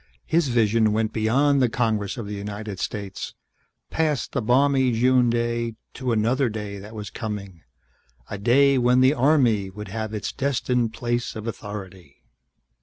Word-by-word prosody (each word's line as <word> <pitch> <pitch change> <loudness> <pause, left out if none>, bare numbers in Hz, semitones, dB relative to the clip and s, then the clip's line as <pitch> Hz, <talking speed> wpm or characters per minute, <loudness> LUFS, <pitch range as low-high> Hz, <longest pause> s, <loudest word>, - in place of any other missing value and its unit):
His 165 -2 +2
vision 115 -3 +2
went 110 0 0
beyond 135 +6 +2
the 125 - +3
Congress 110 -3 -1
of 115 - -5
the 105 - -6
United 100 0 -6
States, 100 -4 -5 0.6
past 155 -6 0
the - - -1
balmy 130 +2 +3
June 125 +1 +3
day 115 -1 -1 0.2
to 130 -2 -2
another 120 +4 +2
day 105 -2 -5
that 105 +3 -11
was 105 -4 -6
coming. 100 -6 -6 0.7
A 105 - -6
day 135 +5 +4
when 125 +1 +4
the 130 +2 +5
Army 125 -8 +3
would 105 +1 -8
have 110 +1 -4
its 105 - -3
destined 125 -4 0
place 120 +1 -2
of 110 0 -6
authority. 95 -8 -8
115 Hz, 155 wpm, -24 LUFS, 105-125 Hz, 0.7 s, the